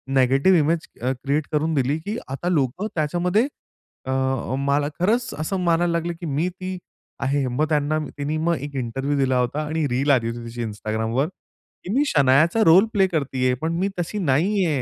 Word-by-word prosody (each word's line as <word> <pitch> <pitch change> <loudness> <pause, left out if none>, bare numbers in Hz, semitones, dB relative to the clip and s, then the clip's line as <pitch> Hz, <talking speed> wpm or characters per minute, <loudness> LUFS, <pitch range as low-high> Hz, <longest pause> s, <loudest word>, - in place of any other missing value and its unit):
Negative 135 +8 +4
image 160 +3 +2 0.2
अ, 125 +2 0
create 145 +2 0
करून 155 +2 0
दिली, 140 +1 +1
की 205 +7 -4
आता 140 +7 -3
लोकं 155 - 0
त्याच्यामध्ये 175 - +1 0.6
अ, 130 - -3 0.5
मला 140 +1 +1
खरंच 225 +6 +1
असं 185 +5 -2
मानायला 170 0 +2
लागले, 170 +1 -1
की 170 +1 -9
मी 155 +5 0
ती 185 0 -6 0.4
आहे." 140 0 +1
मग 125 +5 0
त्यांना 150 0 +1 0.2
तिने 145 +2 -2
मग 170 +2 +1
एक 145 0 -7
इंटरव्ह्यू 135 +4 -2
दिला 130 -2 +2
होता 125 +5 -1
आणि 155 0 -1
रील 135 +4 +1
आली 120 -4 +3
होती 120 +1 -5
त्याची 120 +1 -5
Instagramवर, 110 +5 -2 0.6
की 185 - -4
"मी 275 +4 +3
शनायाचा 150 - +4
रोल 180 +6 +7
प्ले 195 -2 +4
करत 150 -7 -2
आहे, 130 0 +2
पण 160 +1 -1
मी 195 +2 +1
तशी 175 +5 -3
नाही 185 +5 +2
आहे." 150 -6 0
150 Hz, 185 wpm, -23 LUFS, 135-175 Hz, 0.6 s, रोल